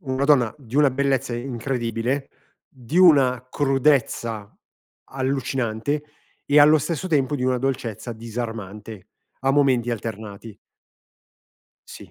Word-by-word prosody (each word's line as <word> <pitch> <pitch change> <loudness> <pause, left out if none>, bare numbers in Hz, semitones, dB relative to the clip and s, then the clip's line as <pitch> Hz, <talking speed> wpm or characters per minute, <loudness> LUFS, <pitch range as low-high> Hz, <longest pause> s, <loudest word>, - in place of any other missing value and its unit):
una 135 -3 -2
donna 130 -7 +4
di 125 -2 -14
una 145 -2 +5
bellezza 135 -1 0
incredibile, 120 +1 -3 0.4
di 135 +6 -4
una 130 -8 +5
crudezza 135 -7 0 0.6
allucinante 130 0 -2 0.4
e 145 +1 +3
allo 150 +1 +7
stesso 160 +4 -3
tempo 145 -4 +1
di 125 - -3
una 130 -1 +1
dolcezza 120 -3 -3
disarmante, 110 -3 -7 0.3
a 135 - +2
momenti 130 -4 +2
alternati. 110 -1 -7 1.3
Sì, - - -12
130 Hz, 110 wpm, -23 LUFS, 115-140 Hz, 1.3 s, allo